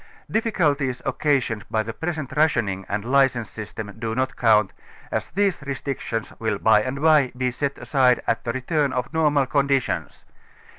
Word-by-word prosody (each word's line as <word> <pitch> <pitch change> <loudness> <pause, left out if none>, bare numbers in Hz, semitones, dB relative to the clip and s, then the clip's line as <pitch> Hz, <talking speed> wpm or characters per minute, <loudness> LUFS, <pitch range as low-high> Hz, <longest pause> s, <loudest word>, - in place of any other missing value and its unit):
Difficulties 150 - 0
occasioned 130 -5 0
bj' 110 -1 0
the 115 - -5
present 155 -2 -4
rationing 115 -11 +1
and 100 +1 -2
license 130 -3 +2
system 110 0 -7
do 110 -1 -3
not 130 +1 -1
count, 110 -4 +3 0.4
as - - -2
these 195 -4 0
restrictions 135 -5 -4
will 110 -2 -1
by 110 +1 +4
and 130 +5 -3
by 150 -5 +5
be 125 0 0
set 140 +3 -3
aside 130 -4 +3
at 115 - 0
the 115 - -1
return 140 +3 0
of 125 +3 -3
normal 150 -3 +3
conditions. 135 0 -1
130 Hz, 155 wpm, -23 LUFS, 115-145 Hz, 0.4 s, by